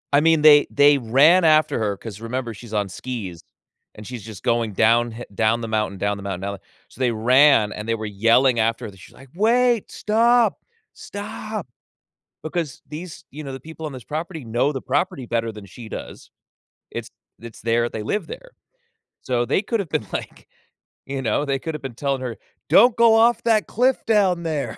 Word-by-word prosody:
I 145 Hz, -, +6 dB
mean, 160 Hz, 0 st, +4 dB
they 150 Hz, -1 st, +7 dB
they 145 Hz, 0 st, +5 dB
ran 140 Hz, +9 st, +4 dB
after 155 Hz, -5 st, +3 dB
her 105 Hz, -2 st, -1 dB
'cause 105 Hz, -1 st, -9 dB
remember, 115 Hz, +1 st, -4 dB
she's 110 Hz, +1 st, -12 dB
on 105 Hz, -2 st, -1 dB
skis 100 Hz, -7 st, -7 dB, 0.5 s
and 105 Hz, -, -11 dB
she's 120 Hz, -3 st, -8 dB
just 110 Hz, -4 st, -10 dB
going 115 Hz, -3 st, 0 dB
downhi 115 Hz, +2 st, +2 dB
down 110 Hz, +2 st, +1 dB
the 115 Hz, -, -4 dB
mountain, 105 Hz, -3 st, -1 dB
down 100 Hz, +1 st, -1 dB
the 100 Hz, -, -9 dB
mountain, 95 Hz, -2 st, -4 dB
down 100 Hz, +1 st, -4 dB, 0.3 s
so -, -, -19 dB
they 125 Hz, -2 st, +2 dB
ran, 120 Hz, 0 st, +4 dB
and 105 Hz, +1 st, -7 dB
they 115 Hz, -, +1 dB
were 110 Hz, -1 st, -6 dB
yelling 115 Hz, +5 st, +3 dB
after 115 Hz, +1 st, 0 dB
her, 100 Hz, -, -15 dB
she's -, -, -16 dB
iike, 135 Hz, +3 st, -17 dB
"Wait, 235 Hz, +2 st, +2 dB
stop, 230 Hz, +1 st, +2 dB, 0.3 s
stop!" 210 Hz, -, -7 dB, 0.8 s
Because 155 Hz, -3 st, -4 dB
these 160 Hz, +1 st, -9 dB
you 155 Hz, +3 st, -9 dB
know, 140 Hz, -, -6 dB
the 135 Hz, -, -7 dB
people 160 Hz, +3 st, -9 dB
on 150 Hz, -, -5 dB
this 130 Hz, -2 st, -9 dB
property 160 Hz, -1 st, -5 dB
know 120 Hz, +5 st, 0 dB
the 135 Hz, -3 st, -5 dB
property 145 Hz, 0 st, -1 dB
better 115 Hz, -1 st, -2 dB
than 105 Hz, -2 st, -11 dB
she 110 Hz, +4 st, -11 dB
does. -, -, -9 dB, 0.6 s
It's -, -, -6 dB, 0.3 s
it's 115 Hz, -1 st, -11 dB
their 115 Hz, +1 st, +1 dB
they 110 Hz, -, -6 dB
live 180 Hz, -, -2 dB
there. -, -, -10 dB, 0.7 s
So 120 Hz, -2 st, 0 dB
they 120 Hz, -, +1 dB
could 225 Hz, +1 st, -1 dB
have 180 Hz, -6 st, -6 dB
been, 110 Hz, -, -2 dB
like, -, -, -7 dB, 0.6 s
you 135 Hz, 0 st, -4 dB
know, 125 Hz, +4 st, 0 dB
they 135 Hz, -1 st, -1 dB
could 160 Hz, +3 st, -5 dB
have 150 Hz, -, -7 dB
been 135 Hz, -3 st, -6 dB
telling 135 Hz, +1 st, -2 dB
her, 125 Hz, -3 st, -5 dB, 0.3 s
"Don't 240 Hz, +2 st, +6 dB
go 230 Hz, -1 st, +6 dB
off 230 Hz, +2 st, +4 dB
that 225 Hz, -2 st, +2 dB
cliff 255 Hz, +3 st, +1 dB
down 195 Hz, -6 st, +3 dB
there," 155 Hz, -4 st, -3 dB
130 Hz, 195 wpm, -22 LUFS, 115-165 Hz, 0.8 s, they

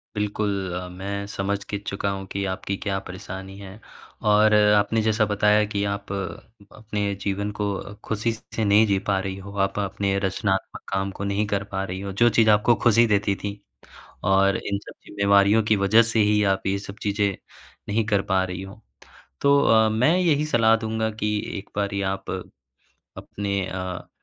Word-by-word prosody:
बिल्कुल। 105 Hz, 0 st, -1 dB, 0.4 s
मैं 100 Hz, +2 st, -5 dB
समझ 100 Hz, 0 st, -2 dB
के 105 Hz, -, -4 dB
चुका 100 Hz, 0 st, -2 dB
हूँ 95 Hz, 0 st, -5 dB
कि 100 Hz, -, -2 dB
आपकी 95 Hz, +1 st, -3 dB
क्या 95 Hz, -1 st, -2 dB
परेशानी 95 Hz, +1 st, -8 dB
है? 100 Hz, +1 st, -10 dB, 0.4 s
और 105 Hz, +1 st, +4 dB
आपने 105 Hz, +1 st, +4 dB
जैसा 110 Hz, 0 st, +2 dB
बताया 105 Hz, +1 st, +3 dB
कि 100 Hz, 0 st, -1 dB
आप 100 Hz, -1 st, -7 dB
अपने 105 Hz, +1 st, -5 dB
जीवन 100 Hz, +1 st, -2 dB
को 105 Hz, -, 0 dB, 0.4 s
ख़ुशी 110 Hz, +1 st, 0 dB
से 110 Hz, 0 st, -4 dB
नहीं 105 Hz, +2 st, +5 dB
जी 100 Hz, -1 st, +2 dB
पा 95 Hz, -1 st, +2 dB
रही 95 Hz, 0 st, -4 dB
हो। 100 Hz, +1 st, -10 dB
आप 95 Hz, +1 st, 0 dB
अपने 100 Hz, 0 st, -1 dB
रचनात्मक 95 Hz, 0 st, -2 dB
काम 95 Hz, 0 st, -1 dB
को 100 Hz, -, -4 dB
नहीं 100 Hz, +1 st, 0 dB
कर 100 Hz, -1 st, -1 dB
पा 95 Hz, 0 st, -2 dB
रही 95 Hz, 0 st, -5 dB
हो। 100 Hz, 0 st, -5 dB
जो 120 Hz, -, +7 dB
चीज़ 110 Hz, -1 st, +3 dB
आपको 105 Hz, +3 st, +4 dB
ख़ुशी 120 Hz, 0 st, +5 dB
देती 100 Hz, -1 st, +1 dB
थी। 100 Hz, +1 st, -6 dB, 0.7 s
और 95 Hz, 0 st, +3 dB
इन 100 Hz, 0 st, -3 dB
सब -, -, -12 dB
जिम्मेवारियों 100 Hz, +1 st, +3 dB
की 105 Hz, 0 st, +2 dB
वज़ह 100 Hz, +3 st, +5 dB
से 115 Hz, -1 st, 0 dB
ही 105 Hz, 0 st, +3 dB
आप 95 Hz, -, -8 dB
ये 100 Hz, 0 st, +1 dB
सब 100 Hz, +1 st, -9 dB
चीज़ें 100 Hz, -1 st, 0 dB, 0.5 s
नहीं 110 Hz, +2 st, +1 dB
कर 100 Hz, -1 st, +3 dB
पा 95 Hz, -, +3 dB
रही 90 Hz, 0 st, -5 dB
हो। 95 Hz, +3 st, -11 dB, 0.6 s
तो 140 Hz, 0 st, +5 dB
अ, 110 Hz, -3 st, +4 dB
मैं 125 Hz, +11 st, +3 dB
यही 155 Hz, -5 st, +2 dB
सलाह 115 Hz, -5 st, +4 dB
दूँगा 110 Hz, 0 st, -2 dB
कि 105 Hz, 0 st, +1 dB, 0.2 s
एक 100 Hz, -, -9 dB
बारी 100 Hz, -1 st, -1 dB
आप 95 Hz, -, -8 dB, 0.9 s
अपने 100 Hz, -1 st, -3 dB
अ 95 Hz, -1 st, -5 dB
100 Hz, 180 wpm, -24 LUFS, 100-110 Hz, 0.9 s, जो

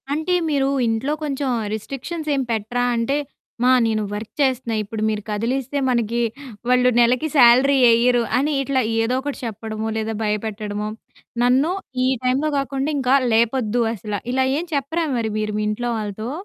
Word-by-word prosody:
అంటే, 315 Hz, +5 st, -1 dB, 0.2 s
మీరు 275 Hz, -2 st, +1 dB, 0.2 s
ఇంట్లో 225 Hz, +6 st, 0 dB
కొంచెం 280 Hz, -2 st, -2 dB, 0.2 s
రిస్ట్రిక్షన్స్ 275 Hz, +8 st, -5 dB
ఏం 270 Hz, -, 0 dB
పెట్టరా? 225 Hz, +3 st, -1 dB
అంటే, 235 Hz, +5 st, 0 dB, 0.5 s
మా 250 Hz, -, +5 dB
నేను 220 Hz, -1 st, 0 dB
వర్క్ 210 Hz, +1 st, -6 dB
చేస్తన్నా 255 Hz, -4 st, 0 dB
ఇప్పుడు 215 Hz, +1 st, -6 dB
మీరు 215 Hz, -1 st, -2 dB
కదిలిస్తే, 250 Hz, +6 st, -2 dB
మనకి 235 Hz, -1 st, 0 dB, 0.5 s
వాళ్ళు 250 Hz, 0 st, +4 dB
నెలకి 245 Hz, +5 st, +3 dB
సాలరీ 260 Hz, +3 st, +6 dB
యెయ్యరు 240 Hz, +1 st, +4 dB
అని, 290 Hz, +4 st, +1 dB
ఇట్లా 270 Hz, -1 st, 0 dB, 0.2 s
ఏదో 235 Hz, +3 st, 0 dB
ఒకటి 285 Hz, 0 st, -5 dB
చెప్పడమో, 220 Hz, 0 st, -4 dB
లేదా 220 Hz, 0 st, -2 dB
భయపెట్టడమో, 210 Hz, 0 st, -3 dB, 0.6 s
నన్ను 260 Hz, +7 st, +3 dB, 0.3 s
ఈ -, -, +3 dB, 0.2 s
టైంలో 265 Hz, +4 st, +1 dB
కాకుండా, 275 Hz, +1 st, -2 dB
ఇంకా 265 Hz, 0 st, +3 dB, 0.2 s
లేపొద్దు 235 Hz, 0 st, +2 dB
అసల. 210 Hz, -1 st, -5 dB, 0.2 s
ఇలా 260 Hz, 0 st, +2 dB
ఏం 335 Hz, -, -2 dB
చెప్పరా 310 Hz, +4 st, -1 dB
మరి 225 Hz, -2 st, -1 dB
మీరు 215 Hz, 0 st, -2 dB
మీ -, -, -1 dB
ఇంట్లో 240 Hz, +3 st, -2 dB
వాళ్ళతో? 215 Hz, +1 st, -4 dB
245 Hz, 155 wpm, -21 LUFS, 220-270 Hz, 0.6 s, సాలరీ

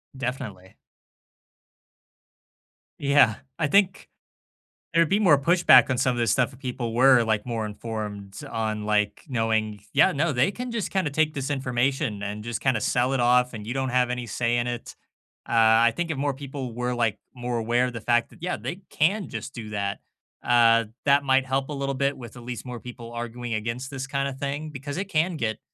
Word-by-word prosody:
Definitely. 125 Hz, -8 st, -6 dB, 2.2 s
Yeah, 140 Hz, -6 st, +4 dB, 0.2 s
I 155 Hz, -, +2 dB
think, 195 Hz, +3 st, +2 dB, 0.8 s
there'd 165 Hz, -1 st, +4 dB
be 205 Hz, +2 st, +2 dB
more 160 Hz, -9 st, +6 dB
pushback 175 Hz, +5 st, +6 dB
on 130 Hz, -, 0 dB
some 125 Hz, -1 st, +1 dB
of -, -, -3 dB
this 115 Hz, -2 st, +2 dB
stuff, 125 Hz, 0 st, +1 dB
if 130 Hz, -, -15 dB
people 125 Hz, -3 st, -4 dB
were, 130 Hz, 0 st, +6 dB
like, 110 Hz, 0 st, 0 dB
more 115 Hz, -2 st, -2 dB
informed 105 Hz, -2 st, -6 dB
on, 110 Hz, -2 st, -2 dB
like, 105 Hz, -1 st, 0 dB
knowing 110 Hz, -4 st, 0 dB
"Yeah, -, -, +6 dB
no, 155 Hz, +3 st, +1 dB
they 130 Hz, +8 st, +2 dB
can 250 Hz, +3 st, -6 dB
just 230 Hz, -4 st, -2 dB
kinda 185 Hz, -7 st, 0 dB
take 155 Hz, +1 st, +2 dB
this 135 Hz, -2 st, -3 dB
information 130 Hz, -4 st, -1 dB
and 105 Hz, +1 st, -5 dB
just 115 Hz, -1 st, -4 dB
kinda 130 Hz, -5 st, +1 dB
sell 125 Hz, +4 st, +1 dB
it 130 Hz, -, +1 dB
off, 125 Hz, +1 st, +3 dB
and 105 Hz, -2 st, -7 dB
you 120 Hz, -, -2 dB
don't 130 Hz, -1 st, -1 dB
have 125 Hz, 0 st, +2 dB
any 125 Hz, -1 st, -3 dB
say 120 Hz, +2 st, 0 dB
in 120 Hz, -, 0 dB
it," 120 Hz, -1 st, -5 dB, 0.5 s
uh, -, -, -5 dB
I 115 Hz, +1 st, +5 dB
think 165 Hz, +5 st, -3 dB
if 145 Hz, -, -2 dB
more 140 Hz, -1 st, 0 dB
people 135 Hz, -3 st, -6 dB
were, 125 Hz, +1 st, -2 dB
like, 115 Hz, -4 st, 0 dB
more 120 Hz, -1 st, -3 dB
aware 120 Hz, +3 st, +1 dB
of 125 Hz, -, -4 dB
the 115 Hz, -, -6 dB
fact 120 Hz, +1 st, +1 dB
yeah, 180 Hz, +2 st, -2 dB
they 180 Hz, +3 st, -6 dB
can 190 Hz, +6 st, +1 dB
just 135 Hz, -, -7 dB
do 110 Hz, -3 st, -7 dB
that, 100 Hz, -1 st, -3 dB, 0.4 s
uh, 115 Hz, -2 st, +4 dB, 0.2 s
that 140 Hz, 0 st, +4 dB
might 135 Hz, -1 st, +2 dB
help 135 Hz, +1 st, -1 dB
a 150 Hz, -, -5 dB
little 140 Hz, -1 st, -2 dB
bit 140 Hz, +1 st, 0 dB
with 120 Hz, -1 st, -10 dB
at 120 Hz, -, -10 dB
least 120 Hz, 0 st, -6 dB
more 125 Hz, -2 st, -6 dB
people 120 Hz, -1 st, -9 dB
arguing 120 Hz, 0 st, -5 dB
against 115 Hz, +5 st, -3 dB
this 135 Hz, 0 st, -5 dB
kinda 140 Hz, -1 st, -1 dB
thing, 140 Hz, +3 st, -4 dB
because 145 Hz, 0 st, -6 dB
it 190 Hz, -, -1 dB
can 170 Hz, 0 st, +1 dB
get, 110 Hz, -5 st, -2 dB
125 Hz, 200 wpm, -25 LUFS, 115-140 Hz, 2.2 s, more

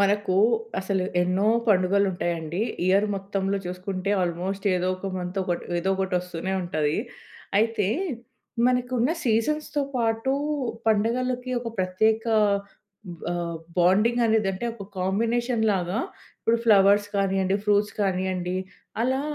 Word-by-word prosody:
మనకు 200 Hz, -1 st, +2 dB, 0.5 s
అసలు 190 Hz, -1 st, -1 dB, 0.2 s
ఎన్నో 185 Hz, +3 st, +1 dB, 0.2 s
పండుగలు 200 Hz, 0 st, +3 dB
ఉంటాయండి. 170 Hz, -1 st, -3 dB, 0.3 s
ఇయర్ 200 Hz, +3 st, +4 dB
మొత్తంలో 195 Hz, 0 st, -2 dB
చూసుకుంటే 185 Hz, +2 st, -3 dB
ఆల్మోస్ట్ 180 Hz, +4 st, -3 dB
ఏదో 180 Hz, +1 st, 0 dB
ఒక 195 Hz, +1 st, -5 dB
మంత్ 180 Hz, +2 st, -4 dB
ఒక 175 Hz, -1 st, 0 dB, 0.2 s
ఏదో 190 Hz, +3 st, 0 dB
ఒకటి 190 Hz, -1 st, -1 dB
ఒస్తూనే 180 Hz, +1 st, -5 dB
ఉంటది. 155 Hz, -4 st, 0 dB, 0.6 s
అయితే 220 Hz, -2 st, +1 dB, 0.8 s
మనకున్న 250 Hz, +1 st, +1 dB
సీజన్స్‌తో 290 Hz, +6 st, 0 dB
పాటు 225 Hz, +2 st, 0 dB, 0.5 s
పండగలకి 245 Hz, +4 st, +1 dB
ఒక 235 Hz, -, -3 dB
ప్రత్యేక 220 Hz, +5 st, +1 dB, 1.1 s
ఆహ్, 170 Hz, -1 st, -2 dB, 0.2 s
బాండింగ్ 210 Hz, +7 st, +4 dB
అనేది 220 Hz, -2 st, +2 dB
అంటే 190 Hz, +5 st, -5 dB
ఒక 220 Hz, -3 st, -9 dB
కాంబినేషన్‌ 230 Hz, +5 st, 0 dB
లాగా 185 Hz, +1 st, -1 dB, 0.4 s
ఇప్పుడు 230 Hz, -, +2 dB
ఫ్లవర్స్ 205 Hz, -1 st, +5 dB
కానివ్వండి, 195 Hz, -1 st, +1 dB
ఫ్రూట్స్ 205 Hz, 0 st, +2 dB
కానివ్వండి 185 Hz, -2 st, -1 dB, 0.5 s
అలా 260 Hz, +2 st, +1 dB
195 Hz, 115 wpm, -25 LUFS, 185-225 Hz, 1.1 s, ఫ్లవర్స్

